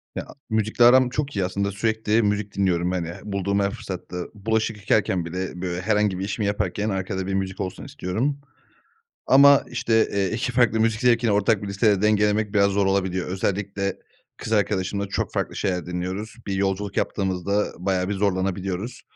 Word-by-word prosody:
Ya, - - -4 0.2
müzikle 110 +2 +2
aram 130 +1 +6
çok 145 +1 -3
iyi. 95 -2 +1
Aslında 100 +2 -1
sürekli 110 +2 +1
müzik 105 -1 -1
dinliyorum, 90 -2 +1
hani, 90 -3 -2
h - - -11
bulduğum 100 -1 -1
her 100 0 +1
fırsatta. 90 -2 -6
Bulaşık 110 +1 -1
yıkarken 100 -3 +1
bile, 90 +1 -5
böyle, 90 -1 -3
herhangi 105 -1 +1
bir 95 - -2
işimi 105 +1 -2
yaparken 100 +1 -1
arkada 95 -1 -3
bir 100 - -2
müzik 95 0 -2
olsun 95 -1 -5
istiyorum. 140 +2 -2 0.9
Ama, 140 +1 +7
işte, 115 -2 +2
eee, 100 -2 0
2 125 +3 -1
farklı 120 -2 +3
müzik 110 0 +1
zevkini 120 -2 +3
ortak 105 +1 +2
bir - - -4
listede 100 0 +2
dengelemek 105 0 +2
biraz 100 -1 +4
zor 100 0 +1
olabiliyor. 95 -2 0
Özellikle 100 +1 -2 0.4
kız 110 - -4
arkadaşımla 100 -1 0
çok 100 - -2
farklı - - -2
şeyler 90 -4 -1
dinliyoruz. 90 +5 -4
Bir 100 - -1
yolculuk 100 +1 -1
yaptığımızda 100 +1 0
bayağı 95 0 -1
bir - - 0
zorlanabiliyoruz. 95 +2 -2
100 Hz, 170 wpm, -24 LUFS, 95-110 Hz, 0.9 s, Ama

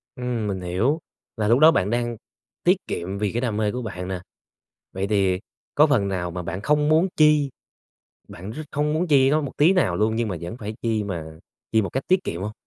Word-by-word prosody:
Ừm, 125 -4 -2
mình 95 -2 -3
hiểu. 110 - 0 0.4
Là 105 -1 0
lúc 120 +4 +4
đó 160 +1 +8
bạn 100 - +1
đang 120 0 -1 0.5
tiết 180 +2 +4
kiệm 95 +3 -4
vì 105 -1 -1
cái 120 - -2
đam 110 -4 -1
mê 105 -1 +1
của 125 - -4
bạn 95 -5 -5
nè, 95 -2 -4 0.7
vậy 95 +1 -3
thì 95 -3 +2 0.4
có 150 +2 +6
phần 115 -9 +2
nào 90 -3 -2
mà 90 +1 -4
bạn 90 +4 -5
không 150 +3 +2
muốn 160 +4 +4
chi, 150 -2 +4 0.8
bạn 95 +5 -8
r 135 - -9
không 150 +1 0
muốn 175 +3 0
chi 135 -3 +4
nó 155 - +3
một 140 -3 -5
tí 160 +6 +5
nào 130 - +2
luôn 110 +1 +1
nhưng 115 -1 0
mà 90 - -3
vẫn 85 +7 -6
phải 110 -2 -6
chi 110 -3 0
mà 85 -5 -4 0.5
chi 110 -1 +4
một 95 - -2
cách 135 - -3
tiết 185 0 +2
kiệm 85 +3 -4
hông? 105 - -4
110 Hz, 230 wpm, -23 LUFS, 95-145 Hz, 0.8 s, đó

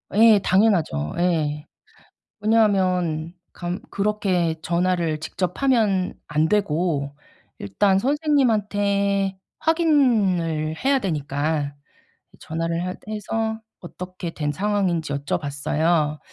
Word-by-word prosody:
예. 220 -1 +7
당연하죠. 185 - +2
예. 155 -4 0 0.8
왜냐하면 185 -7 +2 0.2
감 175 +1 -4
그렇게 195 -5 0
전화를 170 -3 0
직접 180 - -4
하면 215 -8 +2
안 155 +2 +1
되고 160 -7 0 0.4
일단 190 - +1
선생님한테 205 -9 +1 0.2
확인을 210 - +2
해야 275 0 +4
되니까 145 - -2 0.6
이제 - - -21
전화를 165 +2 -3
하 185 - -3 0.2
해서 220 +1 -2 0.2
어떻게 180 0 -7
된 150 -1 -2
상황인지 185 -5 0
여쭤 140 +4 -2
봤어요. 150 +2 0
180 Hz, 220 characters per minute, -23 LUFS, 160-210 Hz, 0.8 s, 예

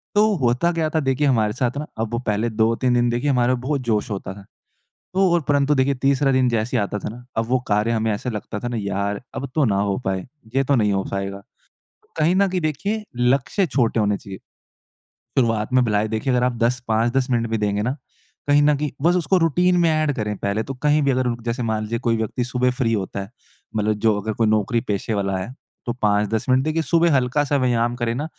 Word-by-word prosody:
तो 215 +1 +4
होता 125 +6 +1
क्या 160 -2 0
था, 160 - 0
देखिए 135 0 +1
हमारे 110 -5 +2
साथ 125 +1 -1
ना, 150 - -3
अब 115 0 -2
वो 120 - 0
पहले 105 +2 +1
2-3 115 +3 +1
दिन 120 0 +2
देखिए 120 +5 0
हमारे 125 -1 +2
बहुत 130 +3 -2
जोश 115 -1 -1
होता 95 -1 -4
था। 100 0 -13 0.7
तो 190 -1 +3
और 175 - +3
परंतु 145 0 +3
देखिए 135 0 +2
तीसरा 135 +1 +2
दिन 130 -1 +3
जैसे 115 +2 0
ही - - +2
आता 105 +1 -3
था - - -5
ना, 120 +3 -10
अब 115 0 0
वो 130 - +2
कार्य 105 +2 +2
हमें 110 0 0
ऐसा 115 +5 -3
लगता 105 -1 -5
था 120 - -3
ना 120 - -3
यार 100 +1 -2
अब 140 - -4
तो 155 - +3
ना 100 -5 +1
हो 100 +1 0
पाए। 95 -1 -2 0.3
ये 135 - +2
तो 140 - +2
नहीं 105 -3 +2
हो 95 -1 0
पायेगा, 100 0 -4 0.8
कहीं 160 +4 +3
न 200 +1 +4
कहीं 185 -1 -1
देखिए 200 +8 -2
लक्ष्य 130 +10 +2
छोटे 120 -5 +1
होने 105 -1 +1
चाहिए। 95 -1 -10 1.0
शुरुआत 115 -3 0
में 130 - +5
भला 105 -2 +1
ही 110 - -1
देखिए 110 +5 -1
अगर 125 0 +2
आप 125 - 0
10, 120 +2 +1
5-10 120 +4 +1
मिनट 115 -1 +1
भी 110 - 0
देंगे 105 -1 0
ना, 125 +5 -1 0.5
कहीं 145 0 +5
न 150 0 +4
कहीं, 150 -1 -2
बस 175 +3 +3
उसको 180 +2 +2
रूटीन 180 +2 +2
में 170 - +4
एड 155 -2 +1
करें 105 -3 -2
पहले 100 +2 -1
तो। 135 - -6
कहीं 150 0 +3
भी 140 - +2
अगर 130 0 0
रुक 120 -1 -2
जैसे 120 +1 -2
मान 110 -1 -1
लीजिए 115 +2 -3
कोई 115 -2 0
व्यक्ति 110 +3 -2
सुबह 125 +1 0
फ्री 125 -2 0
होता 100 -2 -3
है, 100 - -8 0.5
मतलब 110 0 +1
जो 105 -2 +3
अगर 110 +2 -3
कोई 115 +1 +1
नौकरी 110 +2 +1
पेशे 105 +2 -2
वाला 95 -2 -1
है, 95 +7 -5 0.3
तो 120 - -1
5-10 105 0 0
मिनट 130 +1 +4
देखिए 155 +2 0
सुबह 170 +1 +3
हल्का-सा 140 +3 +1
व्यायाम 120 -2 +1
करें 120 -1 -1
ना। 145 - -3
120 Hz, 235 wpm, -22 LUFS, 110-140 Hz, 1.0 s, में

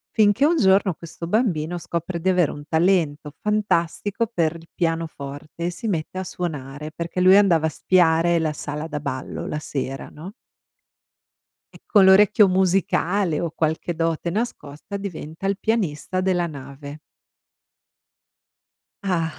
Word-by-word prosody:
Finché 215 +5 +4
un 335 +2 +3
giorno 190 - +4
questo 170 +1 -9
bambino 175 -6 0
scopre 170 +1 -4
di 190 - +1
avere 180 -5 +3
un 145 - -9
talento 160 -4 +1
fantastico 210 +1 0
per 165 -3 +1
il 165 0 -12
pianoforte 165 -2 -4
e - - +1
si 220 +6 -6
mette 175 +1 -3
a - - -3
suonare 150 -4 -5
perché 170 +2 -4
lui 185 +1 +7
andava 175 -6 +4
a - - +2
spiare 170 0 +3
la 155 -2 -1
sala 150 +2 -5
da 150 -2 -4
ballo 130 -3 -5
la 150 - -3
sera, 135 -2 -4
no? 175 +7 -10 1.4
E - - -14
con 200 -3 +5
l'orecchio 205 +2 +6
musicale 185 -1 +1
o 170 - -2
qualche 160 +2 -1
dote 165 0 -1
nascosta 200 -3 -4
diventa 175 -2 -6
il 195 0 +1
pianista 185 -6 -1
della 180 -2 +1
nave. 140 0 -9 2.1
Ah, 165 -4 0
170 Hz, 140 wpm, -23 LUFS, 155-190 Hz, 2.1 s, lui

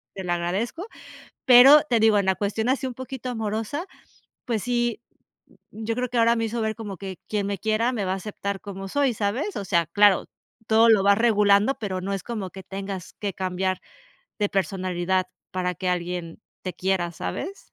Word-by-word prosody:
se 190 - -5
lo 175 - 0
agradezco. 200 - -2 0.6
Pero, 260 +4 +9
te 235 -3 +3
digo, 220 -1 +5
en 200 - 0
la 190 - +4
cuestión 210 +4 -2
así, 265 0 0
un 250 - -5
poquito 260 -1 -6
amorosa. 225 - -3 0.6
Pues 225 -5 -1
sí, 240 -2 0 0.5
mm, 220 - -13
yo 230 - 0
creo 250 -1 -2
que 245 - -2
ahora 230 +1 +4
me 230 0 0
hizo 230 +1 -3
ver 220 0 0
como 205 -5 -7
que, 190 0 -7
quien 205 -2 -1
me 200 -1 -2
quiera 220 +3 +1
me 215 - -2
va 185 - 0
a - - -1
aceptar 200 0 -5
como 195 -1 -7
soy, 280 +1 +1
¿sabes? 225 - -2
O - - -3
sea, 170 -3 +2
claro, 205 +2 +4 0.4
todo 225 +1 +5
lo 215 -4 +5
vas 200 0 +5
regulando, 210 +1 +4
pero, 190 -4 -3
no 195 +2 -3
es 195 - -4
como 215 -6 -4
que 190 - -10
tengas 195 -1 -6
que 200 -3 -3
cambiar 185 0 -2 0.6
de 205 -1 +1
personalidad, 185 -1 0 0.3
para 180 -1 -1
que 185 +3 -3
alguien 175 0 -3 0.2
te 185 - -4
quiera, 185 -2 -1
¿sabes? 370 - -6
205 Hz, 195 wpm, -24 LUFS, 190-230 Hz, 0.6 s, Pero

